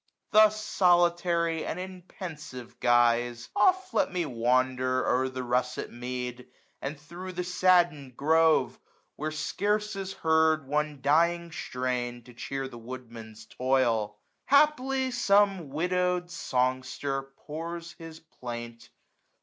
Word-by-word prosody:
Thus 215 0 +6
solitary, 175 -4 +2
and 170 - -4
in 185 0 -7
pensive 150 - -9
guis^f 120 0 +2
Oft 375 0 +3
let 290 - +2
me 180 -2 -1
wander 130 +1 +1
o'er 130 +1 +2
the 130 0 -5
russet 125 +1 -1
mead. 125 0 -5 0.3
And 140 +1 -5
thro* 175 +4 -9
the 180 0 -3
saddened 175 -7 +2
grove, 160 +2 +3 0.4
where 155 +1 -3
scarce 205 +7 -1
is 195 0 -5
heard 160 -3 +2
One 150 0 -1
dying 170 +4 +2
strain, 125 -6 -3
to 125 - -15
cheer 135 +3 -4
the 120 -3 -10
woodman's 115 -2 -10
toil. 115 -5 0 0.3
971 285 +2 +7 0.4
Haply 260 - -2
some 200 - +2
widowed 180 +3 0
songster 130 -1 -1 0.2
pours 165 +2 -6
his 165 -1 -10
plaint. 120 -5 -8
150 Hz, 120 wpm, -28 LUFS, 125-175 Hz, 0.4 s, 971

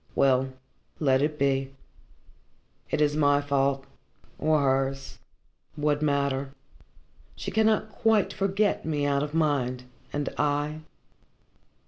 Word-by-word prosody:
Well, 130 -1 +3 0.5
let 135 -3 +3
it 150 +1 0
be. 135 -1 0 1.1
It - - 0
is 150 0 +2
my 145 -1 +4
fault 140 -1 0 0.5
or 155 0 +3
hers. 135 0 -1 0.6
What 150 -1 0
matter? 140 -2 0 0.8
She - - -5
cannot 220 -1 +2
quite 225 -4 +2
forget 200 +1 0
me 150 -2 -1
out 140 -1 +1
of 150 +1 -4
mind 135 -6 0 0.3
and 145 -1 -2
I? 145 +1 0
145 Hz, 110 wpm, -27 LUFS, 135-155 Hz, 1.1 s, my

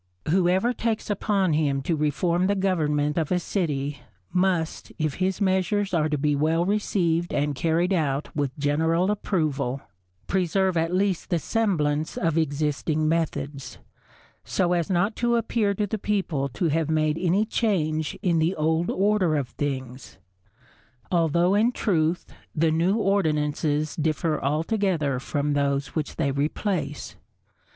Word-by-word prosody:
_ - - -1
Whoever 185 +6 +2
takes 225 -3 -2
upon 195 -4 +1
him 140 -3 +1
to 165 - 0
reform 170 +4 +1
the 200 - +1
government 150 -6 +1
of 160 0 -2
a 180 - +3
city, 145 -6 -2 0.3
must, 180 -3 0
if 155 -3 -2
his 190 0 0
measures 195 0 +1
are 155 -2 +2
to 150 - 0
be 145 +1 +1
well 160 +4 +1
received 175 -4 0
and 145 +1 0
carried 170 +6 +1
out 145 -5 -1
with 145 -2 -2
general 160 +6 +1
approval, 150 -10 -1 0.5
preserve 190 0 +1
at 165 0 +1
least 190 -1 0
the 175 - +2
semblance 160 -6 0
of 165 -3 0
existing 150 -1 0
methods, 150 -4 -2 0.7
so 180 -1 0
as 170 -2 0
not 195 +4 +1
to 235 0 +1
appear 225 -3 0
to 210 - 0
the 210 +2 -3
people 180 -10 -1
to 165 +6 -1
have 160 0 0
made 155 0 +1
any 185 +4 +2
change 160 -9 -1
in 170 -3 +2
the 165 +4 +1
old 160 +2 0
order 195 -4 +2
of 140 -5 -1
things; 130 -2 -5 0.9
although, 170 +1 +2
in 220 +4 +3
truth, 170 -7 0 0.3
the 160 0 +2
new 170 +5 +2
ordinances 155 -7 0
differ 155 0 0
altogether 155 - 0
from 145 +2 -1
those 140 -1 0
which 155 -2 -3
they 140 -4 0
replace. 150 +1 -2
165 Hz, 145 wpm, -25 LUFS, 150-190 Hz, 0.9 s, a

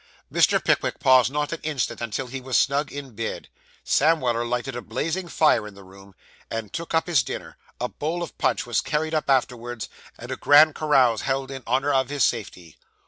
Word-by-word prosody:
Mr. - - +4
Pickwick - - +1
paused 130 -1 +5
not 150 +2 -2
an 165 - -5
instant 145 -8 -3
until 120 +3 -3
he 130 +1 -7
was 130 -1 0
snug 140 +1 +1
in 140 -2 -7
bed. 115 +2 -5 0.3
Sam 160 +3 +3
Weller 120 -3 0
lighted 125 +2 -3
a 120 - -4
blazing 165 +11 -3
fire 155 -10 +2
in 105 - -12
the 100 - -13
room, 95 0 -16 0.3
and 115 -2 -5
took 170 -1 -4
up 160 - +2
his 170 -8 +3
dinner; 115 - -7 0.2
a 125 - -1
bowl 165 +7 -3
of 170 - -8
punch 130 - +1
was 120 -2 0
carried 155 +1 -2
up 155 -2 -1
afterwards, 120 -3 -1 0.3
and - - -9
a - - -1
grand 150 +2 +6
carouse 130 -7 +3
held 135 0 -2
in 135 -1 -6
honour 135 +4 +1
of 130 -1 +1
his 145 -3 0
safety. 90 -9 -3
130 Hz, 200 wpm, -24 LUFS, 120-150 Hz, 0.3 s, grand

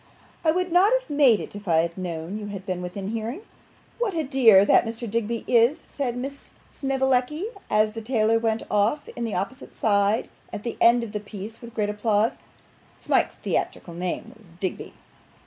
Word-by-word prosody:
'I 315 -1 +4
would 365 0 -1
not 370 +5 +5
have - - -14
made 275 -7 +5
it - - -8
if 205 0 -9
I 160 -2 +4
had 170 0 -3
known 175 +1 -4
you 210 - -6
had 195 -2 -7
been 185 -3 -3
within 190 +2 -5
hearing.' 230 - -4 0.6
'What 440 -7 0
a 320 - 0
dear 240 -8 +6
that - - +5
Mr. 230 +1 -5
Digby 230 +1 -2
is!' 245 +7 +3
said 250 -4 -3
Miss 275 +3 -7
Snevellicci, 270 +3 0 0.2
as 215 0 +2
the 225 - -5
tailor 225 -1 +2
went 225 -1 0
off 210 +8 +1
on 240 - -3
the 220 - -3
opposite 200 +9 -5
side, 205 +1 +2 0.2
at 205 - -6
the 235 - -3
end 235 +1 +6
of 225 - -6
the 210 - -3
piece, 210 +1 -9
with 235 -1 -11
great 210 -2 0
applause. 210 +1 +1 0.6
(Smike's - - +1
theatrical 170 - -3
name 180 +6 -4
was 215 -3 -20
Digby.) 185 -1 -4
225 Hz, 185 wpm, -25 LUFS, 205-260 Hz, 0.6 s, dear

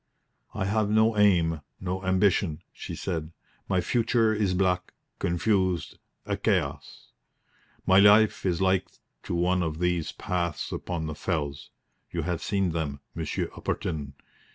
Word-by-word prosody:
"I 95 - -1
have 105 +1 +1
no 110 +1 +4
aim, 85 -7 +3 0.2
no 95 +1 -3
ambition," 95 -3 +2
she - - -7
said. 80 -3 -4 0.4
"My 95 -2 +2
future 115 -1 +2
is 105 -4 +1
black 90 -1 0 0.2
confused 95 0 0 0.3
a - - -1
chaos. - - -2 0.7
My 95 +1 +6
life 105 +1 +6
is 90 -1 0
like 95 0 +2 0.3
to - - -4
one 90 +1 +2
of 80 -2 -2
these 90 -2 0
paths 85 -4 -3
upon 85 -3 -3
the 75 - -3
fells. 75 -4 -3 0.4
You - - -3
have 90 -2 -2
seen 100 -3 0
them, 75 -4 -3
Monsieur - - -2
Upperton. 75 -5 -3
90 Hz, 135 wpm, -27 LUFS, 85-100 Hz, 0.7 s, My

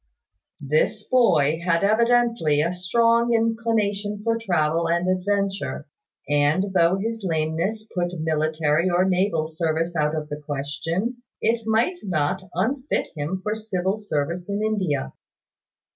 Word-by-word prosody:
This 155 +10 0
boy 170 - +3
had 170 0 +1
evidently 230 -7 +3
a 165 +4 +1
strong 230 +6 +2
inclination 220 -3 0
for 230 0 +1
travel 170 -6 0
and 170 +2 +1
adventure; 195 +1 -1 0.4
and 145 +7 +2
though 175 0 +4
his 225 +3 -3
lameness 170 +6 -1
put 175 -1 -2
military 155 +1 +1
or 180 +1 +3
naval 180 -4 +1
service 165 +1 -1
out 150 -1 +1
of 155 -1 -3
the 150 0 -6
question, 155 - -3 0.2
it 225 0 0
might 230 +12 +1
not 175 -1 -1
unfit 255 - -1
him 160 +5 -3
for 210 - -1
civil 200 -3 -2
service 170 -1 -3
in 200 +1 -1
India. 185 - -1
185 Hz, 130 wpm, -23 LUFS, 160-220 Hz, 0.4 s, though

